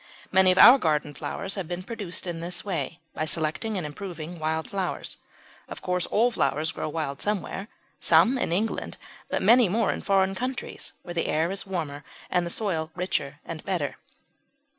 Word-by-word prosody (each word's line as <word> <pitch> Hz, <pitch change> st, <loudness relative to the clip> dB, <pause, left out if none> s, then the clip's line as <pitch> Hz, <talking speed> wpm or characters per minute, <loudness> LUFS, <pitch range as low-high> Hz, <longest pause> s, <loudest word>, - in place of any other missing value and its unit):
Many 190 Hz, 0 st, +6 dB
of 185 Hz, -, +1 dB
our 240 Hz, +7 st, +10 dB
garden 150 Hz, -4 st, +1 dB
flowers 190 Hz, +6 st, -4 dB
have 190 Hz, -5 st, -3 dB
been 175 Hz, +2 st, -4 dB
produced 205 Hz, -5 st, -3 dB
in 170 Hz, -2 st, -4 dB
this 175 Hz, +2 st, -3 dB
way, 175 Hz, -3 st, -3 dB
by 155 Hz, -, -2 dB
selecting 165 Hz, +7 st, 0 dB
and 175 Hz, -, -2 dB
improving 170 Hz, +1 st, -6 dB
wild 160 Hz, +1 st, -1 dB
flowers. 195 Hz, -3 st, -3 dB, 0.5 s
Of -, -, -9 dB
course 180 Hz, -1 st, 0 dB
all 235 Hz, +3 st, +3 dB
flowers 155 Hz, -8 st, +1 dB
grow 155 Hz, -, -4 dB
wild 150 Hz, -3 st, -3 dB
somewhere; 205 Hz, -1 st, -2 dB, 0.3 s
some 250 Hz, -, +5 dB
in -, -, -1 dB
England, 210 Hz, +6 st, -1 dB, 0.3 s
but -, -, -1 dB
many 230 Hz, +1 st, +6 dB
more 225 Hz, +5 st, +2 dB
in -, -, -4 dB
foreign 195 Hz, -1 st, +2 dB
countries, 255 Hz, +5 st, -4 dB
where 175 Hz, -, -6 dB
the 170 Hz, -, 0 dB
air 160 Hz, +3 st, +1 dB
is 195 Hz, 0 st, -4 dB
warmer 155 Hz, -6 st, -3 dB, 0.3 s
and 175 Hz, -1 st, +2 dB
the -, -, -3 dB
soil 170 Hz, -5 st, -1 dB
richer 155 Hz, -5 st, -2 dB
and 160 Hz, -2 st, -6 dB
better. 175 Hz, -8 st, -2 dB
180 Hz, 180 wpm, -26 LUFS, 160-195 Hz, 0.5 s, our